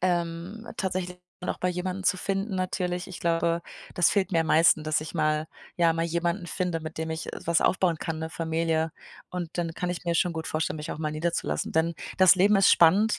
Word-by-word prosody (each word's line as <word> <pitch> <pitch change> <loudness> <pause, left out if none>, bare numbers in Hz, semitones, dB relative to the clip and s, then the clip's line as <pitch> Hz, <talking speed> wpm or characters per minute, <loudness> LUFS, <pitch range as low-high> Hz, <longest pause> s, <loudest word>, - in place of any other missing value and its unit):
Ähm, 175 +4 -2
tatsächlich 180 -1 -3 0.3
auch - - -2
bei 180 - 0
jemandem 180 +1 -3
zu 185 - +2
finden 195 +1 -2
natürlich. 180 -1 -2
Ich 185 -3 -9
glaube, 170 0 +1 0.3
das 175 - +4
fehlt 200 -1 0
mir 165 - +3
am 160 - -1
meisten, 160 -1 +5
dass 155 0 0
ich 155 +2 -8
mal 155 -1 +1 0.3
ja, 170 -2 +4
mal 165 0 -1
jemanden 170 +2 -1
finde, 180 -3 -2
mit 155 0 -7
dem 160 0 -3
ich, 160 0 -4
äh, - - -5
was 170 -1 +3
aufbauen 175 -2 +2
kann, 160 0 -4
'ne 160 0 -4
Familie. 160 0 -1 0.4
Und 180 -2 -4
dann 170 -2 -1
kann 180 +2 -3
ich 180 0 -4
mir 170 -1 +1
schon 175 +1 +2
gut 160 -1 -5
vorstellen, 155 0 -1
mich 150 - -6
auch - - -5
mal 155 -1 -2
niederzulassen, 165 +2 -2
denn 165 +1 +1 0.2
das 185 -1 +8
Leben 200 +3 +4
ist 195 - +6
spannend, 200 +6 +5
170 Hz, 220 wpm, -27 LUFS, 160-180 Hz, 0.4 s, das